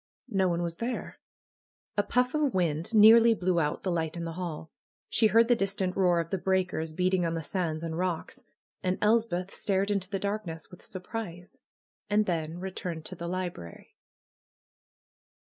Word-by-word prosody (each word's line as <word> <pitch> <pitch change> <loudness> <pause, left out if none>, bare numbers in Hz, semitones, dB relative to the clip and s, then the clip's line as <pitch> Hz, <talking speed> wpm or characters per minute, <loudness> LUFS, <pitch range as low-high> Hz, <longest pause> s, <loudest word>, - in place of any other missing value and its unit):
No 190 -3 +2
one 170 0 0
was 170 -1 -3
there. 240 +2 -4 0.8
A 205 - +3
puff 250 +4 +1
of 300 -6 +1
wind 170 +3 0
near 220 +2 +9
ly 230 0 +5
blew 180 -3 +1
out 150 -2 -1
the 185 - 0
light 165 -1 -1
in 170 - -3
the 165 - -4
hall. 165 -3 -5 0.4
She 220 - +4
heard 230 +2 +5
the 240 - +5
dis 195 -2 -1
tant 185 -2 -1
roar 180 -3 +3
of 165 0 -3
the 190 - 0
breakers, 185 -4 0
beating 180 +2 +1
on 165 0 0
the 165 - -3
sands 165 -2 -2
and 165 -1 -3
roclvs. 175 0 -3 0.4
And 185 0 0
Elspeth 210 -4 +1
stared 195 0 0
into 195 -2 -1
the 200 - -1
darkness 195 -5 -4
with 180 - -13
surprise, 185 -3 -7 0.5
and 210 +1 +3
then 165 -2 -2
returned 175 -3 -5
to 185 - -6
the 170 0 -6
library. 175 - -6
185 Hz, 180 wpm, -29 LUFS, 170-205 Hz, 0.8 s, near